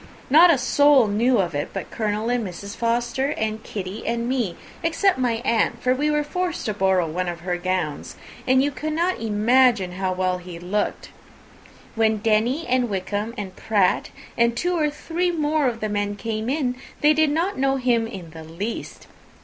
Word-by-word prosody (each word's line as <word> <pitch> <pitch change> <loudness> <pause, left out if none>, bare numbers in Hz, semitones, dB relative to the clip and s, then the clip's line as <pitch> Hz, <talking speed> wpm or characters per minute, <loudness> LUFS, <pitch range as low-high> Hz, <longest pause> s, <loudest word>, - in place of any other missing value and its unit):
Not 330 +5 +8
a 330 - +5
soul 270 +1 +4
knew 230 +5 +2
of 180 -3 0
it, 145 0 -2
but - - -6
Colonel 215 0 -2
and 245 -1 0
Mrs. 200 +2 -7
Forster, 240 +4 0
and 220 0 -2
Kitty 195 +1 -6
and 235 0 -1
me, 245 -9 -1 0.2
except 335 0 +1
my 245 -2 +1
aunt, 235 0 +1
for 255 +1 +2
we 290 +4 0
were 300 0 +1
forced 355 +3 -3
to 215 - -1
borrow 190 -3 +2
one 180 +3 -2
of 170 -1 -6
her 180 0 -2
gowns; 175 -4 -3 0.3
and 260 +1 +4
you 290 - 0
cannot 310 +4 -1
imagine 225 -1 +3
how 185 +1 -2
well 185 0 -1
he 180 -1 -9
looked! 190 +5 -2 0.8
When 220 -1 +2
Denny, 225 +8 +1
and 250 -1 +1
Wickham, 205 +4 -3
and 190 -2 -6
Pratt, 200 -4 +1 0.3
and 235 0 +2
two 355 +1 0
or 305 -3 +1
three 335 +4 -2
more 305 -3 +1
of 230 -2 -3
the 215 - 0
men 205 0 -1
came 220 +2 -3
in, 260 -3 -1 0.2
they 300 +1 +6
did 310 0 +3
not 330 +3 -1
know 270 0 +2
him 245 -3 +1
in 185 -7 -9
the 160 0 -10
least. 180 +8 -6
230 Hz, 185 wpm, -23 LUFS, 195-275 Hz, 0.8 s, Not